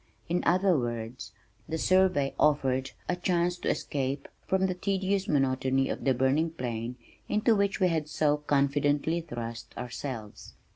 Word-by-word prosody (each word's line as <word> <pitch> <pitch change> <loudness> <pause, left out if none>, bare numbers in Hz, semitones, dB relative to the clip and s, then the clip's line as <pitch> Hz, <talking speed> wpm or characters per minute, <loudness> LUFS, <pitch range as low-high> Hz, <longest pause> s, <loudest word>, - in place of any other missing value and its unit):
In 175 +1 0
other 185 +1 +4
words, 120 0 -4 0.4
the 160 - -1
survey 185 -6 +3
offered 135 -3 +2 0.2
a 180 - +1
chance 175 -1 +1
to - - -1
escape 140 0 -2 0.2
from 190 0 +2
the 185 - 0
tedious 195 +1 -1
monotony 135 -1 +1
of - - -4
the 135 -2 +3
burning 135 +6 +2
plain 120 -5 -4 0.3
into 215 +2 +3
which 200 -1 +1
we 185 -2 +4
had 155 -3 -1
so 150 -1 +2
confidently 145 +2 +1
thrust 120 -6 -7
ourselves. 125 -3 -6
145 Hz, 145 wpm, -29 LUFS, 130-180 Hz, 0.4 s, other